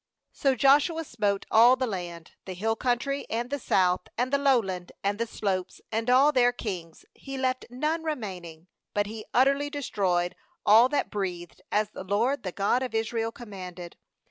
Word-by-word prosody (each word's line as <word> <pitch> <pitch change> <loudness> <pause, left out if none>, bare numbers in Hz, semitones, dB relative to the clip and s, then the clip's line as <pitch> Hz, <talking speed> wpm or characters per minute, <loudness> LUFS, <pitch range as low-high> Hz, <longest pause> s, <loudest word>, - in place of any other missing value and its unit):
40So 270 -2 +1
Joshua 290 +6 +4
smote 205 -8 -1
all 235 +3 +7
the 260 0 -1
land, 175 -6 -6
the 185 - -6
hill 225 +4 0
country, 255 +4 -1
and 240 +3 -2
the 285 - -1
South, 185 -6 +1
and 255 +3 -1
the 280 - +4
Lowland, 210 -11 +1
and 200 +2 0
the 230 - -1
slopes, 190 -4 -3
and 225 +2 -1
all 265 +4 +6
their 245 -3 +4
kings; 180 -9 -6
he 270 0 -8
left 260 -1 -1
none 305 +7 -1
remaining; 185 - -5 0.3
but 205 0 +2
he 215 +1 -7
utterly 275 +3 +3
destroyed 190 - -1 0.3
all 225 +4 +7
that 290 - -1
breathed, 180 -4 -4
as 210 0 +1
the - - -8
LORD, 230 +8 0
the 185 - -4
God 205 +7 +1
of 255 -3 -4
Israel, 225 0 -1
commanded. 185 -7 -9
225 Hz, 170 wpm, -27 LUFS, 190-260 Hz, 0.3 s, all